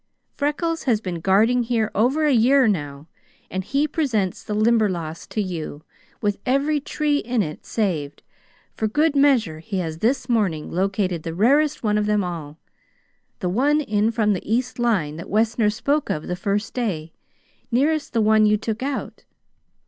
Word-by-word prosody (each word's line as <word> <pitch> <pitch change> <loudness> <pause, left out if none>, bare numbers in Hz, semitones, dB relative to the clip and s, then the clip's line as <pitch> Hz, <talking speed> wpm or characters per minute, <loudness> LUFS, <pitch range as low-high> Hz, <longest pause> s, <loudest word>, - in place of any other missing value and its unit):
Freckles 325 +3 -1
has 235 -6 +2
been 180 -5 -5
guarding 215 +8 +3
here 230 -2 0
over 265 +9 +2
a 295 - +3
year 255 +2 +5
now, 145 -6 -2 0.4
and 190 0 -2
he 280 +8 0
presents 225 - -1
the 210 - -4
Limberlost 210 -8 0
to 215 - -1
you, 160 -5 -6 0.4
with 205 -2 0
every 280 +4 +1
tree 295 +1 0
in 240 -3 0
it 155 -3 -8
saved; 165 -10 -2 0.5
for 220 - -1
good 295 +7 +1
measure 255 - +3
he 195 +4 -5
has 165 -3 -3
this 245 +4 0
morning 200 -11 0
located 190 -1 -1
the 165 +1 -5
rarest 285 - +2
one 210 -1 +2
of 210 - -1
them 210 -1 +2
all: 160 -4 -6 0.8
the 180 - 0
one 280 +10 +2
in 215 -6 +1
from 215 -2 +1
the 195 +2 -5
east 250 +2 -1
line, 190 -11 0
that 165 - -8
Wessner 220 +1 +2
spoke 280 +7 -1
of 150 - -2
the 180 - -2
first 200 +3 -2
day 170 -10 -3 0.6
nearest 285 +5 +1
the 230 - +1
one 215 0 +4
you 210 0 +3
took 220 +2 -4
out. 275 +1 -4
215 Hz, 170 wpm, -22 LUFS, 185-255 Hz, 0.8 s, year